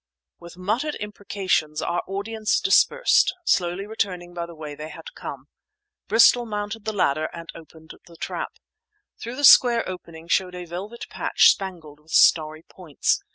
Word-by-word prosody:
With 170 +1 -13
muttered 230 +11 -2
imprecations 195 -7 -2
our 175 +2 -1
audience 215 +3 -1
dispersed, 485 +5 +3
slowly 180 - 0
returning 185 -5 -4
by 170 -1 -5
the 170 - -12
way 155 -2 -8
they 150 +2 -8
had - - -11
come. - - -8 0.6
Bristol 235 +3 +5
mounted 210 0 -5
the 220 - -1
ladder 155 -7 0
and 170 -1 -9
opened 160 -1 -14 0.2
the 170 -1 -16
trap. - - -5 0.7
Through 235 +2 -6
the 290 - -6
square 240 -3 +7
opening 170 -3 -9
showed 180 +1 0
a 180 0 -7
velvet 195 +7 -7
patch - - +4
spangled 170 -7 -7
with 155 +2 -14
starry 155 0 +4
points. 165 -7 -2
185 Hz, 155 wpm, -23 LUFS, 165-215 Hz, 0.7 s, square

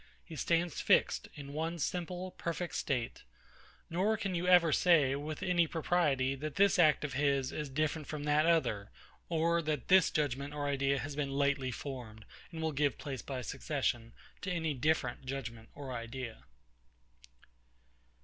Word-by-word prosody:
He 165 - -10
stands 165 +3 0
fixed - - +3
in 140 -1 -8
one 165 +3 -2
simple, 180 +3 -3
perfect 170 0 -4
state: 125 -5 -2 0.7
nor 195 +6 +1
can 195 -3 -2
you 175 +1 -1
ever 175 -3 +6
say, 150 -6 +4
with 150 +2 -5
any 175 -2 +3
propriety, 150 -6 +1
that 145 +2 -5
this 200 -2 +4
act 155 -3 +5
of 145 -3 -3
his 140 -1 +1
is 150 -2 -4
different 155 +2 -1
from 150 -1 -5
that 150 +2 +3
other; 110 -12 +2 0.4
or 170 0 +2
that 150 -4 -3
this 190 -2 +6
judgement 145 -1 -1
or 145 -1 -2
idea 140 0 +1
has 145 +1 -4
been 145 -2 -1
lately 140 -1 +1
formed, 120 -4 -7 0.3
and 160 -1 -5
will 160 - +1
give 140 -3 +1
place, 135 -4 -5
by 130 -2 -5
succession, 125 -4 -2 0.3
to 200 - -3
any 160 -3 0
different 135 -2 0
judgement 115 -4 -5
or 140 -2 -7
idea. 120 0 -6
150 Hz, 160 wpm, -33 LUFS, 135-165 Hz, 0.7 s, ever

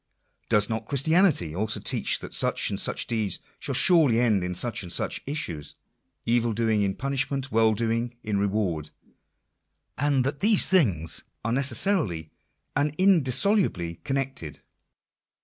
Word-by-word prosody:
Does 105 -1 +3
not 110 -1 -4
Christianity 145 - +2
also 110 +3 -2
teach - - 0
that - - -9
such - - +1
and - - -3
such - - 0
deeds 110 -5 -1 0.2
shall - - -3
surely 155 -11 +4
end 110 -6 +2
in 90 0 -3
such 120 +6 -1
and 90 -3 -8
such - - -1
issues 85 - -4 0.3
— - - -42
evil 120 -1 +1
doing 110 -1 0
in 100 -1 -1
punishment, 135 0 -2
well 110 -1 +3
doing 115 +2 -2
in 105 -3 -1
reward 95 -7 -1 0.6
— - - -53
and 140 -2 +1
that 140 +2 -3
these 210 +3 +5
things 100 - +1 0.2
are 115 - 0
necessarily 130 - +1 0.4
and 145 +1 0
indissoluble 180 - +2
connected 135 - -4
115 Hz, 145 wpm, -25 LUFS, 100-140 Hz, 0.6 s, these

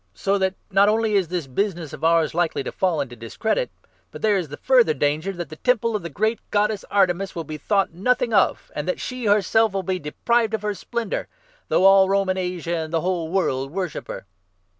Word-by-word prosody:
So 195 - 0
that 190 0 0 0.2
not 195 +2 +5
only 220 0 +1
is 195 -4 +2
this 175 -2 -3
business 170 +2 -2
of 155 - -9
ours 165 -1 +3
likely 170 -4 0
to - - -5
fall 175 -6 0
into 125 -3 -6
dis 115 -1 -10
27 - - -25
credit, - - 0 0.4
but - - -11
there 215 -2 +4
is 180 -4 -1
the 145 +1 -8
further 245 -12 +3
danger 150 +6 0
that 175 -3 -6
the 155 - -10
Temple 230 0 +1
of 210 - -1
the 170 - -6
great 220 +9 0
Goddess 210 0 +1
Artemis 190 -1 +1
will 165 - -3
be 155 0 -7
thought 195 -2 +1
nothing 235 +5 0
of, 195 - +2
and 150 - -3
that 180 - -1
she 255 -3 -4
herself 210 +1 +3
will 195 -1 -1
be 185 0 -2
deprived 225 +9 0
of 215 - -6
her 210 0 -1
splendour 230 +3 -4 0.2
— - - -34
though 185 - +3
all 195 0 +7
Roman 195 -1 +1
Asia 180 -2 -2
and 160 -1 -4
the 165 -1 0
whole 175 -2 -1
world 135 -8 0
worship 185 -1 -4
her." - - -7
190 Hz, 225 wpm, -23 LUFS, 165-210 Hz, 0.4 s, all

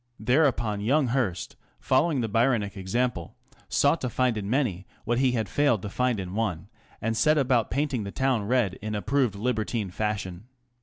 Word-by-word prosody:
Thereupon 120 -4 +1
young 130 +4 +2
Hearst, 110 -9 -1 0.2
following 140 +1 +2
the 115 - -1
Byronic 115 -2 +1
example, 100 0 -2 0.3
sought 145 +4 +2
to 125 - -1
find 125 0 +1
in 100 -2 -4
many 110 -8 -1 0.2
what 120 +2 +1
he 130 -2 +3
had 110 -4 -1
failed 140 -7 +1
to 105 - -4
find 125 +1 0
in 90 -1 -5
one, 100 -4 -2 0.3
and 115 0 0
set 155 +7 +3
about 125 -5 +2
painting 140 -4 -1
the 100 - -5
town 130 -5 0
red 115 -6 +1
in 105 +1 -3
approved 120 +2 0
libertine 110 -2 -2
fashion. 100 -1 -3
115 Hz, 170 wpm, -26 LUFS, 100-130 Hz, 0.3 s, he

